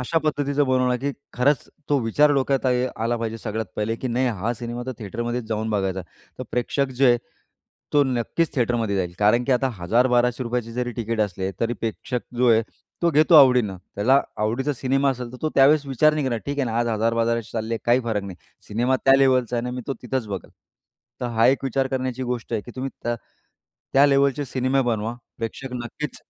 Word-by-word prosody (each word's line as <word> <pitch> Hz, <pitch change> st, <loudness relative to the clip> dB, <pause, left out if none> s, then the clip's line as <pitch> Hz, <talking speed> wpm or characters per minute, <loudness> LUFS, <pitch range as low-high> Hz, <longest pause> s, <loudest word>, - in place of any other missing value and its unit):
अशा 160 Hz, +6 st, +1 dB
पद्धतीचं 145 Hz, -2 st, 0 dB
बनवलं, 130 Hz, -1 st, +2 dB
की 140 Hz, +1 st, -1 dB, 0.2 s
खरंच 135 Hz, +2 st, +1 dB, 0.2 s
तो 145 Hz, -1 st, +3 dB
विचार 145 Hz, +6 st, +3 dB
डोक्यात 135 Hz, 0 st, +1 dB
आहे 125 Hz, 0 st, +2 dB, 0.2 s
आला 120 Hz, +1 st, +1 dB
पाहिजे 115 Hz, -1 st, -4 dB
सगळ्यात 110 Hz, 0 st, -4 dB
पहिले 105 Hz, +2 st, -1 dB
की 130 Hz, -, -4 dB
नाही 125 Hz, +2 st, +1 dB
हा 115 Hz, +5 st, 0 dB
सिनेमा 120 Hz, +1 st, -5 dB
तर 130 Hz, -, -3 dB
थिएटरमध्येच 120 Hz, +3 st, -3 dB
जाऊन 110 Hz, 0 st, -2 dB
बघायचा. 95 Hz, -2 st, -1 dB, 0.4 s
तर -, -, -4 dB
प्रेक्षक 135 Hz, +3 st, 0 dB
जे 135 Hz, 0 st, +4 dB
आहे, 120 Hz, -1 st, +5 dB, 0.7 s
तो 145 Hz, -, +5 dB
नक्कीच 130 Hz, +5 st, -1 dB
थिएटरमध्ये 115 Hz, -5 st, 0 dB
जाईल. 90 Hz, -2 st, -1 dB
कारण 115 Hz, +4 st, +3 dB
की 135 Hz, -, +1 dB
आता 130 Hz, +1 st, +2 dB
₹1000-1200 125 Hz, +4 st, +2 dB
चे 115 Hz, +1 st, -10 dB
जरी 125 Hz, 0 st, -2 dB
टिकट 115 Hz, -1 st, -2 dB
असले, 95 Hz, -2 st, -1 dB
तरी 115 Hz, +1 st, +1 dB
प्रेक्षक 115 Hz, +3 st, -3 dB, 0.2 s
जो 125 Hz, 0 st, +3 dB
आहे, 115 Hz, 0 st, +5 dB, 0.4 s
तो 170 Hz, -, +4 dB
घेतो 155 Hz, +3 st, +4 dB
आवडीनं. 125 Hz, -9 st, +6 dB, 0.2 s
त्याला 130 Hz, +7 st, +4 dB, 0.2 s
आवडीचा 120 Hz, +7 st, 0 dB
सिनेमा 135 Hz, +2 st, +1 dB
असेल, 125 Hz, -1 st, -5 dB
तर -, -, -8 dB
तो 155 Hz, -, +1 dB
त्यावेळेस 140 Hz, +2 st, +5 dB
विचार 150 Hz, +3 st, +3 dB
नाही 150 Hz, -2 st, -1 dB
करणार 120 Hz, -3 st, -1 dB
ठीक 140 Hz, 0 st, -3 dB
आहे 140 Hz, -, +2 dB
ना 115 Hz, -, -1 dB
आज 120 Hz, 0 st, +1 dB
₹1000-1200 115 Hz, 0 st, 0 dB
चालले 115 Hz, 0 st, -2 dB
काही 120 Hz, +2 st, +4 dB
फरक 110 Hz, -4 st, -1 dB
नाही. 95 Hz, -3 st, -8 dB, 0.3 s
सिनेमा 120 Hz, +5 st, +1 dB
त्या 135 Hz, -, +7 dB
लेव्हलचा 130 Hz, -3 st, +3 dB
आहे 120 Hz, -, -1 dB
ना, 125 Hz, -, -3 dB
मी 125 Hz, 0 st, -5 dB
तो 135 Hz, -, -2 dB
तिथंच 125 Hz, -1 st, -2 dB
बघेल. 95 Hz, -3 st, -6 dB, 0.7 s
तर 125 Hz, -, -1 dB
हा 115 Hz, -, +5 dB
एक 135 Hz, +1 st, +2 dB
विचार 135 Hz, +1 st, 0 dB
करण्याची 130 Hz, -1 st, -2 dB
गोष्ट 120 Hz, -2 st, -4 dB
आहे 110 Hz, -, 0 dB
की 120 Hz, -, -11 dB
तुम्ही 135 Hz, +1 st, -3 dB, 0.2 s
त 120 Hz, -, +1 dB, 0.8 s
त्या 140 Hz, +2 st, +6 dB
लेव्हलचे 140 Hz, +1 st, +2 dB
सिनेमे 130 Hz, +1 st, 0 dB
बनवा. 115 Hz, -1 st, -1 dB, 0.2 s
प्रेक्षक 125 Hz, +3 st, -5 dB
नक्कीच 150 Hz, +5 st, -6 dB
125 Hz, 200 wpm, -23 LUFS, 115-135 Hz, 0.8 s, त्या